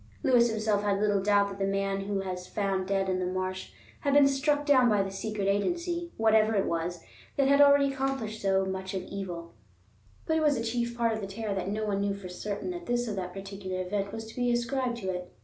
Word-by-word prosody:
Lewis 240 -2 +5
himself 215 -2 0
had 200 -1 +1
little 205 -1 +2
doubt 205 0 +3
that 195 0 -8
the 195 - +1
man 195 0 -1
who 205 0 -2
was 185 -2 -3
found 195 -2 -1
dead 195 -1 +1
in 185 -1 0
the 185 - -1
marsh 185 0 -3 0.3
had 280 -1 +1
been 285 -1 +7
struck 290 +2 +1
down 260 -4 +5
by 205 -2 +3
the 195 - -5
secret 205 0 -3
agency, 345 - -1
whatever 220 0 +4
it 195 - +2
was, 170 0 -2 0.3
that 275 -1 +3
had 280 +1 +5
already 280 -1 +6
accomplished 265 -5 -2
so 195 -1 +2
much 190 0 -4
of 185 - -2
evil; 175 -4 -6 0.7
but 320 - +1
it 320 - +2
was 295 -3 +3
a 230 - -2
chief 235 +1 -2
part 230 -1 +2
of 220 - -3
the 195 - -4
terror 210 +1 -4
that 190 -1 -2
no 215 +1 -2
one 200 -1 0
knew 200 0 0
for 195 -2 -8
certain 205 - -4
that 350 -1 -7
this 240 0 0
or 215 - -2
that 185 -2 -4
particular 195 -1 -6
event 195 +2 -2
was 225 0 -6
to 220 - -12
be 245 -1 +1
ascribed 240 +1 0
to 200 -5 -6
it. 180 0 -6
205 Hz, 235 wpm, -29 LUFS, 195-245 Hz, 0.7 s, been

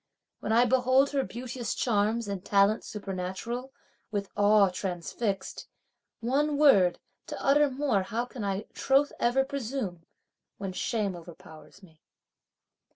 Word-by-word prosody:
When 215 - -3
I 235 +2 +5
behold 260 +2 +3
her 275 -2 +1
beauteous 240 -1 -5
charms 220 0 +1
and 200 -2 -4
talents 200 +2 +2
supernatural, 205 +6 -5 0.4
with 200 -2 -3
awe 205 -1 +5
transfixed, 190 +3 -4 0.5
One 285 +5 +1
word, 200 -12 +5 0.3
to - - -6
utter 290 +1 +4
more 265 -6 0
how 225 +6 -2
can 245 -2 -8
I 200 +1 -2
troth 275 +2 +2
ever 265 +3 +2
presume, 245 - -4 0.5
when 195 -2 -5
shame 205 -1 -1
overpowers 170 +2 -13
me. 160 -4 -19
220 Hz, 125 wpm, -28 LUFS, 195-260 Hz, 0.5 s, I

